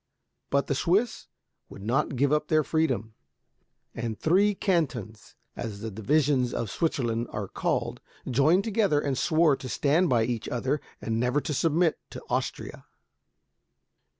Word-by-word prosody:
But 140 0 +2
the - - -1
Swiss 190 - 0 0.4
would 100 - -11
not 135 +6 0
give 140 +3 +2
up 150 0 +1
their 155 -1 +3
freedom; 130 -10 0 0.8
and 115 -2 -4
three 195 +5 +3
cantons, 125 - -2 0.2
as 105 -3 -6
the 110 -1 -4
divisions 130 +3 +1
of 110 -4 -3
Switzerland 120 -7 -1
are 105 -2 -4
called, - - -2 0.3
joined 150 +9 +3
together, 205 -8 +2
and 140 -2 -1
swore 155 +1 +3
to 130 - -8
stand 155 +8 +2
by 120 -3 +3
each 115 0 -3
other, 130 +4 -1 0.2
and 115 0 -1
never 125 +4 +1
to 150 - -3
submit 165 +3 +2
to - - -9
Austria. - - -3
140 Hz, 145 wpm, -27 LUFS, 115-160 Hz, 0.8 s, their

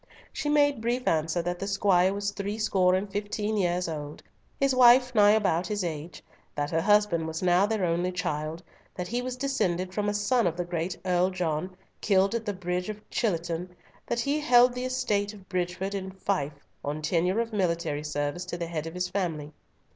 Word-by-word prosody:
She 295 - -2
made 290 -4 +3
brief 240 +2 -1
answer 160 +2 +1
that 175 +1 -3
the 195 - -3
squire 190 -2 +3
was 200 0 -2
threescore 200 -2 +1
and 190 +2 -1
fifteen 205 +1 -2
years 180 -2 0
old, 150 -2 -6 0.4
his 275 -1 +3
wife 250 0 +6
nigh 205 -2 +6
about 185 -5 +1
his 205 -1 -2
age; 160 -1 -5 0.3
that 145 0 -2
her 165 0 +1
husband 205 -5 +3
was 160 +2 -4
now 180 +2 +4
their 215 -3 0
only 175 +2 0
child; 160 -1 -3 0.3
that 180 -1 -4
he 240 +2 -1
was 255 0 -4
descended 185 -10 -1
from 205 +1 0
a 205 - -1
son 210 +2 +2
of 170 0 -2
the 175 - -2
great 175 +1 -3
Earl 180 0 +2
John, 180 -1 -2 0.3
killed 195 0 +3
at 230 -1 -3
the - - +1
Bridge 180 0 -3
of 210 0 -8
Chatillon, 175 -3 -2 0.3
that 235 0 0
he 285 +3 0
held 245 -4 +5
the 250 +1 -3
estate 210 -5 -1
of 195 -2 -16
Bridgefield 185 +2 -2
in 190 -1 -4
fief 190 -5 -2 0.3
on 150 +2 -4
tenure 180 +6 +1
of 230 -1 -2
military 170 -6 -1
service 150 +3 -3
to 175 -1 -5
the 170 - -3
head 165 -1 -4
of 165 - -8
his 180 0 -1
family. 165 -6 -3
185 Hz, 195 wpm, -27 LUFS, 170-210 Hz, 0.4 s, wife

